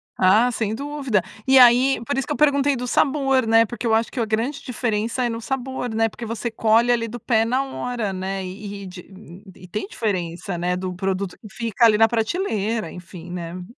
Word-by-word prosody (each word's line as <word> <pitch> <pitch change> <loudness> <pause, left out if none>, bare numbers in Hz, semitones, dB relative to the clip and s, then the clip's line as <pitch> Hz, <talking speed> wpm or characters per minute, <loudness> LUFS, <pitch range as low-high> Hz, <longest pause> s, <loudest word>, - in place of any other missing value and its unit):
Ah, 215 +7 +4
sem 220 -2 -2
dúvida. 275 -4 -1 0.3
E 265 0 +7
aí 250 +2 +6
por 285 - -2
isso 270 - 0
que - - -2
eu - - -5
perguntei 285 -1 +3
do 250 0 -4
sabor, 270 -1 +2
né, 225 0 +5
porque 240 +2 -7
eu 225 - +2
acho 225 +1 +1
que - - -5
a 230 - +1
grande 230 +6 -2
diferença 230 0 -2
é 240 - +1
no 230 0 -4
sabor, 260 -1 -4
né, 225 0 +2
porque 230 - -8
você 230 +1 -3
colhe 225 +1 +3
ali 230 -1 +1
do 240 +2 -7
pé 225 -1 +2
na 255 +4 +1
hora, 245 -5 -3
né. 190 +1 -3
E 200 +2 -7
e - - -8
di 185 +1 -12
e 180 - -14
tem 195 +3 -4
diferença, 185 -4 -3
né, 180 +1 -1
do 185 0 -4
produto 190 0 -3
que 215 - -13
fica 230 +1 +1
ali 215 -2 +5
na 225 +1 +6
prateleira, 225 - -1
enfim, 175 -1 -10
né. 170 -1 -5
Hum. 180 - -7
225 Hz, 220 wpm, -22 LUFS, 195-250 Hz, 0.3 s, E